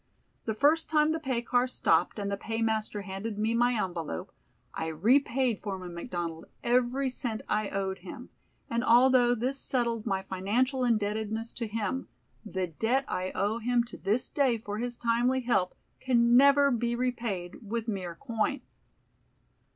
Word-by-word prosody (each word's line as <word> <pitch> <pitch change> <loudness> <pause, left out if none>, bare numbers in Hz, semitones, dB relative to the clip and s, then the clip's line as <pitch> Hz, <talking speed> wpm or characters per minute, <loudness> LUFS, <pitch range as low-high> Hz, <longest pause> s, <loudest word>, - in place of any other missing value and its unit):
The 220 - -1
first 300 +7 +3
time 305 0 +3
the 320 - -1
pay 260 -6 -2
car 245 +1 +2
stopped 255 - +1
and 200 -1 -3
the - - 0
paymaster 220 -1 -2
handed 200 +2 -5
me 220 +2 +1
my 240 +1 +3
envelope 180 -2 -3 0.4
I 160 - -3
repaid 235 - +2
Foreman 185 -4 -5
McDonald 170 -3 -5 0.2
every 250 +3 +2
cent 245 -3 -4
I 210 -1 0
owed 195 -1 -2
him, - - -10 0.4
and 235 +1 -1
although 245 0 +5
this 255 +4 -2
settled 235 -4 -1
my 190 -2 0
financial 240 +8 0
indebtedness 220 0 0
to 235 - -4
him, 220 +4 -3 0.4
the 190 -4 -2
debt 225 - 0
I 185 +1 -2
owe 210 +4 0
him 240 +1 +2
to 235 - -10
this 215 +5 0
day 265 -5 +2
for 210 -1 -5
his 240 0 -3
timely 240 +3 +1
help 235 -7 +1 0.2
can 240 -2 +3
never 280 +2 +6
be 235 0 0
repaid 235 -8 -3
with 230 +1 -2
mere 185 -5 -3
coin. 235 +5 -2
230 Hz, 155 wpm, -29 LUFS, 205-250 Hz, 0.4 s, never